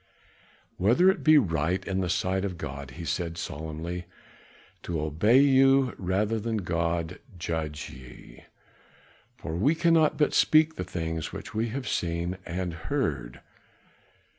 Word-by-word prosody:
"Whether 125 - +5
it - - -6
be 155 0 +7
right 85 - +1
in 95 -1 -1
the 90 - -2
sight 95 +3 0
of 95 -3 -3
God," 70 -3 -6
he 85 - -6
said 85 0 -2
solemnly, 80 +3 -5 0.8
"to 85 -2 -3
obey 80 - +3
you 135 -2 +4
rather 100 +4 0
than 115 +1 -2
God, 85 -2 -2 0.2
judge 80 -3 -4
ye. 65 -1 -14 0.9
For 80 - -5
we 135 - +2
cannot 165 -2 +3
but 150 - +2
speak 155 +1 +4
the 90 - -4
things 80 -3 -4
which - - -8
we 110 +2 0
have 130 +3 -5
seen 85 +2 -2
and 90 0 -3
heard." - - -3
90 Hz, 140 wpm, -27 LUFS, 80-115 Hz, 0.9 s, be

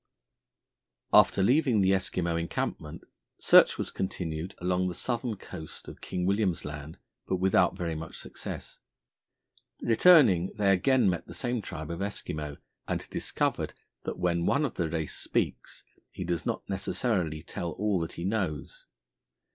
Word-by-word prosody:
After 95 - +6
leaving 125 -1 +3
the 95 0 +4
Eskimo 90 -3 0
encampment, 85 -1 -3 0.3
search - - +6
was - - -3
continued 85 -1 -4
along 90 +1 0
the 90 - -3
southern 120 -2 -2
coast 80 -4 -10
of - - -10
King 90 -1 -3
William's 100 -3 +1
Land, 75 +1 -7 0.3
but 95 - +1
without 95 0 +3
very 85 -2 -2
much 80 +1 -7
success. - - -8 1.0
Returning, 115 - +5
they 100 -3 +3
again 125 +4 +3
met 90 -2 -1
the - - -9
same 120 -2 -1
tribe 80 -4 -6
of 85 - -5
Eskimo, 75 -7 -4 0.3
and - - -2
discovered - - -1 0.3
that - - -5
when 85 -1 0
one 145 +2 +3
of 135 - -3
the 85 -3 -1
race 80 -1 -2
speaks - - -2 0.3
he - - -5
does 85 -2 -2
not - - -3
necessarily 95 -5 -1
tell 85 -2 -4
all 105 -2 0
that 80 -1 -4
he 85 - -6
knows. 305 - -3
90 Hz, 145 wpm, -29 LUFS, 85-105 Hz, 1.0 s, After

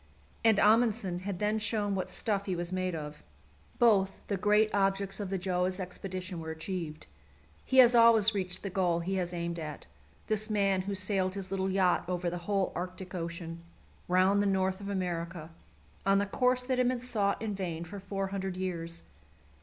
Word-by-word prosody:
And 225 -2 +5
Amundsen 215 -4 +3
had 190 0 -4
then 210 +3 0
shown 210 -2 0
what 190 -1 -2
stuff 200 -2 -1
he 185 - 0
was 175 +1 -4
made 185 -1 -1
of: 150 -1 -7 0.6
both 200 -5 +3
the 200 - +1
great 210 +2 +3
objects 195 0 +1
of 200 -2 -3
the 195 - -1
Gjöa's 185 0 -1
expedition 185 -1 -5
were 160 0 -6
achieved. 160 -1 -5 0.6
He 260 - -1
has 245 -2 +9
always 230 -2 +6
reached 185 -2 -3
the 195 - -4
goal 175 -3 +1
he 185 +3 -2
has 175 -1 -1
aimed 170 -1 -3
at, 150 -2 -6 0.4
this 215 0 0
man 195 -3 +2
who 200 +1 -3
sailed 185 0 0
his 195 -1 -6
little 190 0 0
yacht 185 -2 +2
over 180 -1 -1
the 175 - -4
whole 195 -2 +1
Arctic 185 +1 -6
Ocean, 170 -1 -5 0.5
round 185 +3 +4
the 205 - +1
north 190 0 +1
of 200 - -5
America, 170 -3 -3 0.5
on 195 0 +4
the 200 - +2
course 250 +4 +1
that 255 0 -1
had 250 - +3
been 250 0 0
sought 210 -5 0
in 215 -1 -3
vain 175 -4 -3
for 200 +4 -8
four 195 0 -3
hundred 190 -1 -3
years. 170 -3 -4
190 Hz, 185 wpm, -30 LUFS, 180-205 Hz, 0.6 s, has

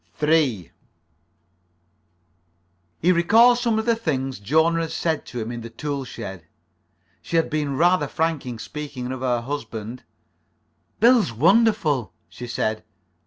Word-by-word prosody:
3 150 - +1 2.3
He 180 - +5
recalled 225 +8 +5
some 235 -3 +1
of 220 - -1
the 235 -1 +3
things 135 - -2
Jona 160 +10 +2
had 165 - -3
said 160 -3 -2
to 125 - -6
him 110 +1 -4
in 120 -1 -6
the 115 - -8
tool 140 +3 -4
shed. 95 -8 -8 0.7
She - - -5
had 165 -1 +2
been 145 -3 -1
rather 175 -2 +3
frank 160 -2 -1
in 120 -2 -5
speaking 140 0 -6
of 130 -1 -5
her 125 -2 0
husband. 115 -3 -6 1.0
"Bill's 235 - +5
wonderful," 165 - +2 0.2
she 125 - -9
said. 110 -2 -2
145 Hz, 135 wpm, -23 LUFS, 120-170 Hz, 2.3 s, He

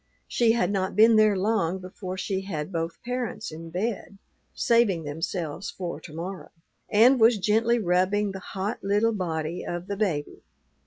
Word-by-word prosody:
She 230 -2 +3
had 200 -5 +1
not 190 -2 -1
been 220 +2 +6
there 215 -2 +5
long 190 -3 +1
before 185 0 -7
she 190 0 -2
had 175 -4 -5
both 165 -1 -4
parents 245 -4 -4
in 165 +1 -8
bed, 200 +2 -3 0.3
"saving 225 -8 +2
themselves 165 +3 -4
for 175 -2 -5
to - - -11
morrow," 180 +3 -6 0.4
and 245 +5 +5
was 225 0 +6
gently 225 +4 +2
rubbing 195 +1 +1
the 190 - -7
hot 195 +4 -4
little 205 +3 +2
body 165 -3 -3
of 175 0 -4
the 200 +1 -4
baby. 170 -9 -2
195 Hz, 160 wpm, -26 LUFS, 175-215 Hz, 0.4 s, been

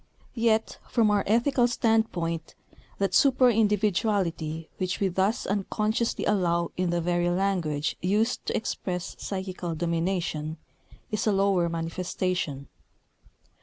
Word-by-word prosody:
Yet, 225 -2 +1
from 225 -3 +3
our 205 -1 +2
ethical 240 +3 +3
standpoint, 220 -9 0 0.4
that 195 -1 0
super 260 -2 +5
individuality 200 -7 0
which 185 -1 -1
we 195 - +2
thus 190 +5 0
unconsciously 215 +3 -1
allow 170 -4 +1
in 180 -1 0
the 175 0 +1
very 175 +1 +1
language 175 -5 0
used 210 +6 +1
to - - 0
express 180 -5 -4
psychical 185 -3 -4
domination, 165 -2 -1 0.5
is 215 +1 -1
a - - +4
lower 195 -3 +2
manifestation. 165 -3 -2
190 Hz, 115 wpm, -27 LUFS, 170-215 Hz, 0.5 s, super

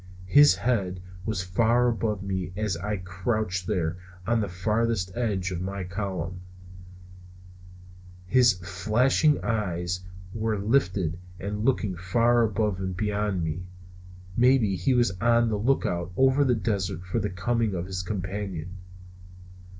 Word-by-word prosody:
His 145 +5 +7
head 95 -3 -1 0.3
was 105 -4 -1
far 115 +6 +2
above 110 -4 -1
me 95 -2 -3
as 105 -4 0
I 105 +5 -3
crouched 95 0 -2
there 85 -1 -1 0.3
on 115 +1 +2
the 105 - -2
farther 110 +5 0 0.2
edge 100 -6 -1
of 90 -1 -3
my 95 +1 -4
column; 90 -2 -4 1.8
his 125 +2 +5
flashing 120 - +2
eyes 90 -6 -1 0.3
were 110 -1 -1
lifted 95 - +1 0.2
and 105 +2 -3
looking 115 -7 +1
far 115 +7 +2
above 105 -3 0
me 95 - -2
and 90 -1 -5
beyond 105 -3 -1
me. 80 +3 -4 0.7
Maybe 120 -5 +4
he 95 +9 +1
was 120 -6 +3
on 115 0 +4
the 105 -2 -1
lookout 90 -7 0
over 135 +2 +4
the 125 -3 +3
desert 100 -6 -2
for 90 +6 -1
the 105 -1 -1
coming 105 +3 0
of 85 0 -3
his 95 -1 -4
companion. 95 -2 -4
100 Hz, 135 wpm, -26 LUFS, 90-115 Hz, 1.8 s, His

